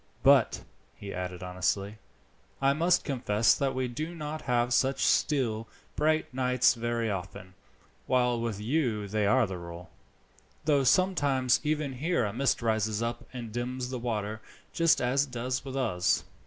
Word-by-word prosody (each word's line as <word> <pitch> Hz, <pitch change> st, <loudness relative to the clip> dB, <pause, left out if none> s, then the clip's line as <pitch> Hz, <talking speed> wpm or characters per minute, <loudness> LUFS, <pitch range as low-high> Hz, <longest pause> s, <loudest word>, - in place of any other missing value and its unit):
"But," -, -, +4 dB, 0.3 s
he 100 Hz, -1 st, -8 dB
added 90 Hz, 0 st, -5 dB
honestly, 100 Hz, +3 st, -2 dB, 0.6 s
"I 135 Hz, 0 st, +3 dB
must 170 Hz, +4 st, +2 dB
confess 115 Hz, -6 st, +2 dB
that 135 Hz, -2 st, -1 dB
we 130 Hz, -1 st, -1 dB
do 155 Hz, +8 st, -5 dB
not 155 Hz, -1 st, -5 dB
have 120 Hz, -1 st, +1 dB
such 135 Hz, +2 st, +2 dB
still, 115 Hz, -7 st, +1 dB, 0.3 s
bright 155 Hz, -2 st, +1 dB
nights 125 Hz, -1 st, +3 dB
very 115 Hz, -2 st, -2 dB
often, 90 Hz, -1 st, -6 dB, 0.5 s
while 125 Hz, -2 st, +2 dB
with 115 Hz, -4 st, -3 dB
you 115 Hz, -3 st, -1 dB
they 105 Hz, 0 st, 0 dB
are 130 Hz, +3 st, +4 dB
the 95 Hz, -3 st, -6 dB
rule, 85 Hz, 0 st, -10 dB, 0.7 s
though 145 Hz, -3 st, +3 dB
sometimes 140 Hz, -6 st, +3 dB
even 150 Hz, -2 st, -1 dB
here 155 Hz, 0 st, 0 dB
a 100 Hz, -, -3 dB
mist 130 Hz, 0 st, 0 dB
rises 110 Hz, -1 st, 0 dB
up 120 Hz, 0 st, -4 dB
and 120 Hz, -3 st, -7 dB
dims 125 Hz, +2 st, -4 dB
the 130 Hz, -, -3 dB
water, 110 Hz, -2 st, -3 dB, 0.3 s
just 165 Hz, -1 st, +3 dB
as 130 Hz, +3 st, +2 dB
it 135 Hz, -, -17 dB
does 125 Hz, +1 st, -2 dB
with 135 Hz, -1 st, -7 dB
us." 100 Hz, -9 st, +1 dB
120 Hz, 155 wpm, -29 LUFS, 110-135 Hz, 0.7 s, But